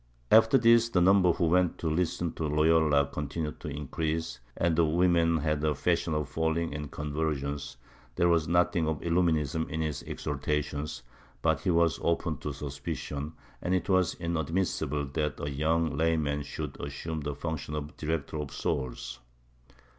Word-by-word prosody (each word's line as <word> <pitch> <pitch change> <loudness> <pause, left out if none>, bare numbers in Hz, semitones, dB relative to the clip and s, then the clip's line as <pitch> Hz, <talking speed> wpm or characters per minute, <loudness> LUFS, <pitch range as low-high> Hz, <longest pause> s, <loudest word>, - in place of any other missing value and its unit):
After 110 +4 +7
this 115 -1 +5
the 95 - +2
number 90 0 +5
who 85 - 0
went 90 +1 +2
to 85 - -3
listen 85 +1 0
to 80 - -2
Loyola 75 -1 +4
continued 75 +2 -4
to - - -7
increase, 75 +1 -3 0.2
and 85 -1 +2
the 85 - +4
women 85 0 +3
had 75 -1 -1
a 75 -1 +2
fashion 85 +1 0
of 75 -3 -1
falling 80 +1 -1
in 75 0 -4
convulsions, 75 -2 -3 0.4
there 85 - +3
was 85 -3 +3
nothing 85 -1 +2
of 80 -2 -1
illuminism 80 -3 +1
in 80 0 -2
his 75 -3 -2
exhortations, 75 -2 -3 0.4
but - - +3
he - - -2
was 85 -1 +3
open 85 -2 0
to 75 - -4
suspicion, 70 +1 -5 0.3
and 90 +1 +1
it 95 - -2
was 95 -2 +3
inad 85 -3 -2
missible 80 -4 -1
that 75 -2 -1
a 70 - -3
yomig 80 +2 +1
layman 80 -2 +1
should 75 0 -6
assume 75 +3 -4
the 75 0 -3
function 75 -1 -4
of 75 -1 -4
a - - -17
director 80 -1 -3
of 75 -2 -4
souls. 60 -2 -3
80 Hz, 165 wpm, -29 LUFS, 75-85 Hz, 0.4 s, After